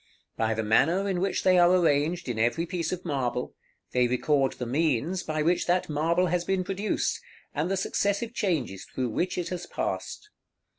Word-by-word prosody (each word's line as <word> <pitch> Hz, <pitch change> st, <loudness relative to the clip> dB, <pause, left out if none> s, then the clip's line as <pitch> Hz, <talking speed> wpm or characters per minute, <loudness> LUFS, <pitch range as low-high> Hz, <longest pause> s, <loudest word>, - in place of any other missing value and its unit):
By 110 Hz, 0 st, 0 dB
the 110 Hz, -, -1 dB
manner 165 Hz, -, +3 dB
in 190 Hz, -3 st, 0 dB
which 195 Hz, 0 st, 0 dB
they 185 Hz, -1 st, +5 dB
are 175 Hz, 0 st, +6 dB
arranged 165 Hz, -2 st, +2 dB
in 120 Hz, -3 st, -2 dB
every 120 Hz, +9 st, +1 dB
piece 175 Hz, -1 st, -3 dB
of 185 Hz, 0 st, -4 dB
marble, 125 Hz, -5 st, -2 dB, 0.4 s
they 125 Hz, -1 st, +3 dB
record 135 Hz, +2 st, +1 dB
the 125 Hz, -, -5 dB
means 155 Hz, +6 st, 0 dB
by 155 Hz, -1 st, -2 dB
which 175 Hz, +3 st, +1 dB
that 180 Hz, 0 st, +1 dB
marble 165 Hz, +4 st, +2 dB
has 175 Hz, 0 st, 0 dB
been 190 Hz, +1 st, 0 dB
produced, 195 Hz, +3 st, -1 dB, 0.3 s
and 155 Hz, +4 st, -1 dB
the 195 Hz, -, 0 dB
successive 205 Hz, +4 st, -1 dB
changes 155 Hz, -, -1 dB
through 130 Hz, -2 st, -3 dB
which 175 Hz, +11 st, -1 dB
it 175 Hz, -, -2 dB
has 175 Hz, -1 st, -5 dB
passed. 420 Hz, -, -4 dB
170 Hz, 185 wpm, -27 LUFS, 130-185 Hz, 0.4 s, are